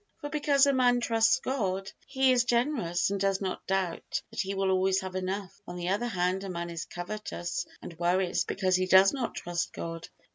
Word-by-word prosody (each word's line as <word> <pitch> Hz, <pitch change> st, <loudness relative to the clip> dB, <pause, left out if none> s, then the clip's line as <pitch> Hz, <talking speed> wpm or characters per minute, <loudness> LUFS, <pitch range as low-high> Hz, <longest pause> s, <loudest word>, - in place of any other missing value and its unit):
For 290 Hz, -2 st, -6 dB
because 290 Hz, -2 st, +3 dB
a 280 Hz, -, +3 dB
man 245 Hz, -2 st, +4 dB
trusts 225 Hz, -1 st, +3 dB
God, 195 Hz, -7 st, -2 dB, 0.2 s
he 265 Hz, -1 st, +3 dB
is 245 Hz, -1 st, +4 dB
generous 235 Hz, -, +1 dB
and 200 Hz, -, -1 dB
does 195 Hz, 0 st, +1 dB
not 190 Hz, -2 st, -4 dB
doubt 190 Hz, -3 st, -1 dB
that 225 Hz, -, -7 dB
he 195 Hz, 0 st, -3 dB
will 195 Hz, 0 st, +1 dB
always 190 Hz, 0 st, +2 dB
have 190 Hz, -1 st, -6 dB
enough; 190 Hz, +2 st, -4 dB
on 175 Hz, -, -6 dB
the 175 Hz, 0 st, -3 dB
other 210 Hz, +5 st, 0 dB
hand, 185 Hz, -2 st, 0 dB
a 195 Hz, -, -5 dB
man 170 Hz, -1 st, -4 dB
is 170 Hz, 0 st, -5 dB
covetous 175 Hz, -2 st, -5 dB, 0.2 s
and 165 Hz, -2 st, -9 dB
worries 175 Hz, +1 st, +1 dB
because 185 Hz, -1 st, 0 dB
he 185 Hz, 0 st, +1 dB
does 190 Hz, +1 st, +7 dB
not 260 Hz, -4 st, -3 dB
trust 175 Hz, 0 st, -3 dB
God. 165 Hz, 0 st, -6 dB
190 Hz, 205 wpm, -29 LUFS, 180-235 Hz, 0.2 s, does